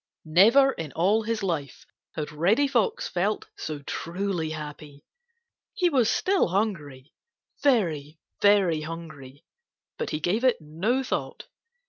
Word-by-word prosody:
Never 225 - +6
in 160 - -6
all 200 +6 +2
his 220 -1 -3
life 155 -8 -3 0.3
had 150 -1 -4
Reddy 195 - +2
Fox 445 - 0
felt 195 +4 -1
so 150 -2 -6
truly 175 +1 -3
happy. 150 -2 -8 0.7
He 360 -7 +2
was 250 -6 +3
still 390 0 +2
hungry,—very, 170 - -2 0.2
very 195 -6 +4
hungry. 155 -3 -9 0.5
But - - -2
he 155 - -2
gave 195 +9 0
it 255 -2 +4
no 180 - -1
thought. - - -4
175 Hz, 120 wpm, -26 LUFS, 155-225 Hz, 0.7 s, Never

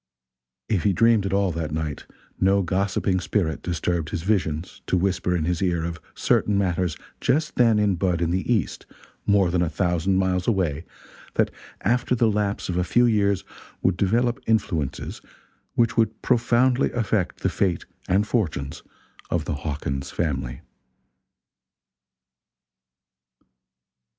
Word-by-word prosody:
If 95 - +1
he 100 - +2
dreamed 115 0 +4
at - - -3
all 100 -1 +2
that 80 -2 -3
night, 80 -1 -4 0.3
no 95 +1 +3
gossiping 95 +1 0
spirit 85 -5 -1
disturbed 85 -2 -1
his 90 -4 -4
visions 90 -5 -1
to 95 - +2
whisper 90 -1 0
in 85 - 0
his 90 0 -1
ear 85 -3 +1
of 85 -1 -4 0.2
certain 105 -1 +2
matters 90 -4 0 0.2
just 155 +5 +1
then 115 -3 +4
in 105 -3 +2
bud 90 -1 +1
in 85 -1 0
the 95 +6 -1
East, 105 -9 -1 0.4
more 100 -4 +4
than 90 0 +1
a 85 - +1
thousand 90 +3 +1
miles 90 -1 +1
away 85 -7 0 0.5
that - - +2 0.3
after 125 +3 +1
the 115 -2 +3
lapse 105 -1 -1
of 90 - -2
a 90 - +2
few 120 +8 +3
years 100 -4 +2 0.4
would 95 - +3
develop 120 +7 +1
influences 90 -10 -1 0.5
which 115 -2 +2
would 110 -1 +2
profoundly 125 +2 +3
affect 105 -5 -1
the - - +1
fate 90 -4 0 0.2
and 100 +3 +2
fortunes 80 - -2 0.5
of 85 -3 -1
the 80 - -2
Hawkins 70 -2 -3
family. 65 -6 -2
95 Hz, 140 wpm, -24 LUFS, 85-105 Hz, 0.5 s, dreamed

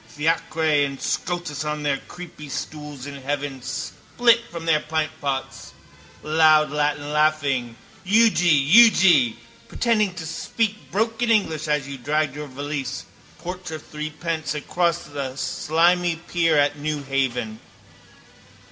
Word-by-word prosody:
Fiacre 160 +5 -1
and 145 -3 +2
Scotus 175 -4 -3
on 150 0 -3
their 145 -2 +1
creepystools 150 -4 -8
in 140 0 -7
heaven 140 -1 -3
spilt 235 - +1
from 170 -1 -7
their 160 -2 +3
pintpots, 150 -3 -3 0.5
loudlatinlaughing: 150 -4 +2 0.3
Euge! 180 -8 +4
Euge! 180 - +6 0.3
Pretending 215 -6 +1
to 165 - -6
speak 215 +6 -3
broken 225 +3 0
English 160 -9 +1
as 150 -2 0
you 140 -1 -7
dragged 150 +2 -1
your 150 0 -6
valise, 140 -1 -5 0.3
porter 180 -2 -6
threepence, 155 0 -4
across 170 +3 0
the 140 -3 -5
slimy 170 +5 +1
pier 165 -1 0
at 145 0 +2
Newhaven. 135 -6 -2
150 Hz, 105 wpm, -23 LUFS, 145-170 Hz, 0.5 s, Euge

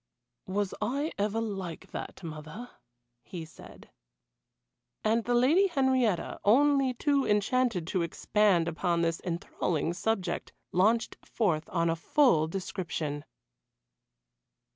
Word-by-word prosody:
"Was 195 0 -1
I 280 +9 -1
ever 210 +2 0
like 195 -7 -5
that, - - -7
mother?" 160 +9 -8 0.5
he 170 +3 -7
said. 160 - -15 1.1
And 225 +1 +2
the 245 - +1
Lady 305 +11 +4
Henrietta, 260 - +1
only 270 +3 +4
too 280 +1 +2
enchanted 210 -2 +1
to 185 +1 -1
expand 175 +1 +2
upon 170 +1 0
this 165 0 0
enthralling 170 -2 -2
subject, 185 -2 -2 0.2
launched 220 +5 +2
forth 170 -8 -1
on 170 -2 +1
a 165 - +1
full 165 - +3
description. 160 -5 -4
200 Hz, 110 wpm, -29 LUFS, 170-245 Hz, 1.1 s, Lady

